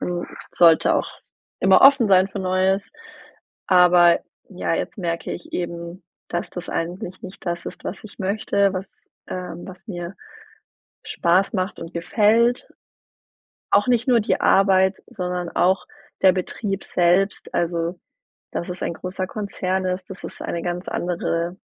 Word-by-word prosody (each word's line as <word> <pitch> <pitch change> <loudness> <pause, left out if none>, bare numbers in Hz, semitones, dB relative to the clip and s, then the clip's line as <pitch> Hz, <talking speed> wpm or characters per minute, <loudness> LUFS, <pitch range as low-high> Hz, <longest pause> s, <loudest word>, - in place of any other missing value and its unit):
man 175 -1 -3 0.3
sollte 165 -2 +5
auch - - 0 0.5
immer - - +6
offen 275 -4 +7
sein 190 0 +5
für 200 - -6
Neues, 185 +1 +1 0.8
aber 180 -2 +6 0.3
ja, - - -2
jetzt - - -4
merke 170 -2 -3
ich 175 - -8
eben, 170 +1 -5 0.3
dass 175 - -3
das 180 -1 -7
eigentlich 180 +3 -4
nicht 185 0 -11
das 170 0 -2
ist, - - -8
was 200 - -6
ich 215 - -12
möchte, 200 0 +1
was 190 +1 -5 0.4
ähm, 180 -2 -6
was 185 +4 -12
mir 175 -2 -6 0.9
Spaß 180 +3 +1
macht 185 +1 -2
und 165 +1 -8
gefällt. 220 +7 +2 1.0
Auch 205 +4 +4
nicht 245 0 +2
nur 245 -2 +5
die - - 0
Arbeit, 190 0 +4
sondern 180 -2 -4
auch 190 +2 +2 0.4
der 190 -1 +7
Betrieb 195 +2 -3
selbst, 180 +3 +1
also 170 +1 -1 0.5
dass 170 - -4
es 180 0 -6
ein - - -2
großer 185 +2 -5
Konzern 190 -3 -2
ist. 185 +1 -3
Das 190 - -9
ist - - -8
eine 170 - -3
ganz 175 0 -3
andere 175 0 -2
185 Hz, 145 wpm, -22 LUFS, 175-195 Hz, 1.0 s, offen